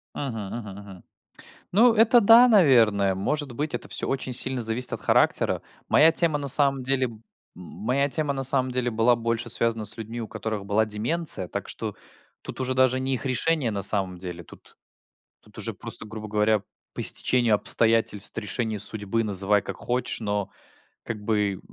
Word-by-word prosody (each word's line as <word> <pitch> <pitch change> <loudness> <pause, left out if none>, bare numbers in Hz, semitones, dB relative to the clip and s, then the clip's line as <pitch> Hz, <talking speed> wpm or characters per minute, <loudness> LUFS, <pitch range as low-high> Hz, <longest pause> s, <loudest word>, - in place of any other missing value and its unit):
Мгм, 115 -8 -5
мгм, 105 -4 -8
мгм. 100 -3 -13 0.7
Ну 225 +4 +5
это 225 +2 +5
да, 230 +4 +7
наверное. 115 - +4
Может 145 +8 -3
быть, 150 +5 -4
это - - -5
всё - - -2
очень 130 -1 -3
сильно 130 0 +1
зависит 115 +3 +1
от - - -4
характера. - - +1 0.3
Моя 160 +2 +5
тема 165 -3 +3
на 140 -1 -5
самом 140 0 +3
деле 130 0 0
м, 115 -3 -11 0.4
моя 125 +10 -2
тема 150 0 +2
на 135 -1 -4
самом 130 -1 +2
деле 125 -1 -1
была 115 +2 +3
больше 115 0 -3
связана 115 -1 -1
с - - -2
людьми, 115 +1 -7
у 110 - -6
которых 110 -3 -5
была 110 +2 +1
деменция, 110 - 0
так - - -6
что - - -6 0.5
тут - - -8
уже 130 0 -1
даже 130 0 +2
не 135 0 -1
их 130 - -5
решение 135 0 0
на 100 -1 -4
самом 95 -2 0
деле. 90 -1 -8
Тут - - -18 0.7
тут - - -17
уже - - -5
просто, - - -6
грубо 110 0 -8
говоря, 105 0 +1 0.3
по - - -4
стечению 120 -3 +1
обстоятельств, 110 -2 +2
решению 110 +1 -3
судьбы- 110 +2 -1
называй 100 0 0
как - - -7
хочешь, 125 0 -2
но 105 -2 -3 0.5
как 110 -2 -6
бы 105 -2 -1
115 Hz, 175 wpm, -24 LUFS, 105-135 Hz, 0.7 s, да